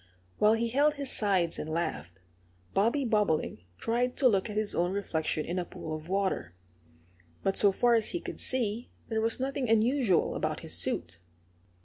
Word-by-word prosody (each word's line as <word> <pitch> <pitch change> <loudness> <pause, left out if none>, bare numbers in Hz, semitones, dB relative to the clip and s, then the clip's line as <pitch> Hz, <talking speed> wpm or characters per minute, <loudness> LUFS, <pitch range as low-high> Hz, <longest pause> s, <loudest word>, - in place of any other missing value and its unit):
While 210 +1 +5
he 230 +1 0
held 290 +5 +2
his 280 -2 -2
sides 190 -6 +2
and 155 - -5
laughed, 95 - -4 0.5
Bobby 235 +8 +2
Bobolink 205 - 0
tried 245 +2 -1
to 270 - +5
look 200 -2 +1
at 210 - -5
his 215 -1 -1
own 175 +1 0
reflection 160 -6 -2
in 180 +2 -2
a - - -1
pool 160 -2 -6
of 155 +2 -9
water. 190 - -1 0.9
But 195 - +1
so 200 - +5
far 240 +5 +2
as 225 -2 +2
he 345 - -2
could - - -8
see 235 -2 0 0.2
there 220 -1 0
was 225 +2 +2
nothing 265 -1 -2
unusual 225 - +2
about - - -2
his - - -1
suit. 85 - -1
210 Hz, 175 wpm, -29 LUFS, 175-240 Hz, 0.9 s, While